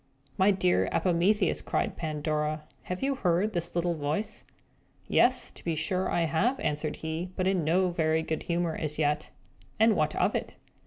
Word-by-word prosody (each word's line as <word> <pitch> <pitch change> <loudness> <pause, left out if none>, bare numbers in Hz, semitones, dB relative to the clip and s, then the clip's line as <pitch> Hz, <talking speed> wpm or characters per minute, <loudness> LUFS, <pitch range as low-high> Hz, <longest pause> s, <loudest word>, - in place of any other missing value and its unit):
"My 190 +2 +4
dear 95 - +2
Epimetheus," 185 +4 +2
cried - - -1
Pandora, 155 -1 -2 0.2
"have 180 +5 -4
you 275 +1 +2
heard 200 -3 +1
this 170 0 -2
little 175 0 +1
voice?" 165 +8 -3 0.6
"Yes, - - +3
to - - -15
be 165 -2 -1
sure 180 +4 -1
I 175 - +1
have," 195 - +1
answered 150 0 -2
he, 160 +3 -4
but 185 - -1
in 190 -3 +2
no 180 +4 +2
very 160 -1 +1
good 160 -1 -2
humour 170 -1 0
as 150 -1 -4
yet. 150 0 0 0.5
"And 220 -1 +5
what 155 -2 +1
of - - +2
it?" - - -3
170 Hz, 170 wpm, -28 LUFS, 155-185 Hz, 0.6 s, And